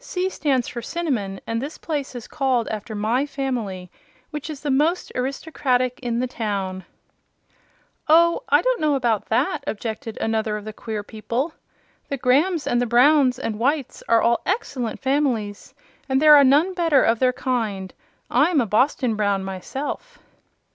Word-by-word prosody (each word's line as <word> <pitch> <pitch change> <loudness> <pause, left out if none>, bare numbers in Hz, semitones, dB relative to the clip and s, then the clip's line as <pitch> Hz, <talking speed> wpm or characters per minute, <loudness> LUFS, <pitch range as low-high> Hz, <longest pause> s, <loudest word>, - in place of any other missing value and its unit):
"'C' 375 -5 -2
stands 270 -8 0
for 240 - -5
Cinnamon, 235 - -3
and 230 0 -2
this 290 +4 -6
place 290 -5 -4
is 240 - -7
called 255 -4 0
after 215 +1 -5
my 220 +6 +1
family, 245 -11 -4 0.4
which 300 0 -6
is 300 -3 -7
the 290 - -1
most 310 +7 +1
aristocratic 255 -1 -1
in 240 -2 -2
the 250 - 0
town." 200 -6 -3 1.2
"Oh, 335 +2 +5
I - - +4
don't - - +1
know 300 -2 +2
about 235 -6 0
that," 275 +5 0
objected 225 0 -4
another 220 -1 -1
of 210 - -9
the 215 - -6
queer 215 -1 -5
people. 235 +9 -3 0.6
"The 280 - -2
Grahams 290 +6 +2
and 240 - +1
the 245 - 0
Browns 255 +2 +4
and 220 -3 -4
Whites 280 +2 -1
are 230 -1 +4
all 235 0 +2
excellent 265 - -2
families, 255 -7 -1 0.3
and 265 0 +3
there 305 0 +8
is 275 - +5
none 305 +8 +4
better 330 -6 +3
of 225 0 +2
their 255 -1 +3
kind. 220 -7 -2 0.3
I'm 345 -4 +3
a 245 - +2
Boston 240 +2 +1
Brown, 200 -2 0
myself." 270 - -6
255 Hz, 160 wpm, -23 LUFS, 220-290 Hz, 1.2 s, there